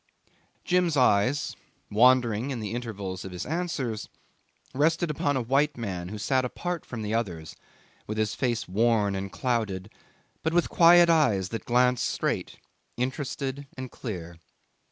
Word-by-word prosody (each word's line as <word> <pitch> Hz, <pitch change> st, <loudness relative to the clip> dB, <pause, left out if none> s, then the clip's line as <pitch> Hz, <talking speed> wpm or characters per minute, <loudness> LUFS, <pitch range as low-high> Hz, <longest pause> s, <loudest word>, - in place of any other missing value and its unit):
Jim's 180 Hz, -4 st, +2 dB
eyes, 125 Hz, +2 st, +2 dB, 0.4 s
wandering 120 Hz, +1 st, +4 dB
in 130 Hz, -4 st, -3 dB
the 105 Hz, -2 st, -4 dB
intervals 100 Hz, -6 st, -5 dB
of 95 Hz, -, -7 dB
his 90 Hz, -1 st, -5 dB
answers, 145 Hz, -9 st, -3 dB, 0.6 s
rested 160 Hz, +4 st, +2 dB
upon 145 Hz, -1 st, 0 dB
a 130 Hz, -, -1 dB
white 140 Hz, +4 st, +1 dB
man 90 Hz, -6 st, -4 dB
who 105 Hz, -, -6 dB
sat 130 Hz, +5 st, +1 dB
apart 175 Hz, +6 st, -3 dB
from 115 Hz, -3 st, -6 dB
the 105 Hz, +1 st, -2 dB
others, 85 Hz, -9 st, -3 dB, 0.5 s
with 110 Hz, -, -4 dB
his 110 Hz, -1 st, 0 dB
face 120 Hz, -3 st, -1 dB
worn 105 Hz, 0 st, +2 dB
and 95 Hz, 0 st, -4 dB
clouded, 110 Hz, -6 st, -2 dB, 0.5 s
but 160 Hz, -, -1 dB
with 175 Hz, -, +3 dB
quiet 175 Hz, 0 st, +7 dB
eyes 125 Hz, -, +3 dB
that 115 Hz, -, -5 dB
glanced 125 Hz, 0 st, +3 dB
straight, -, -, -2 dB, 0.4 s
interested 135 Hz, +2 st, -3 dB
and 130 Hz, -1 st, -6 dB
clear. 85 Hz, -8 st, -7 dB
120 Hz, 145 wpm, -27 LUFS, 105-140 Hz, 0.6 s, quiet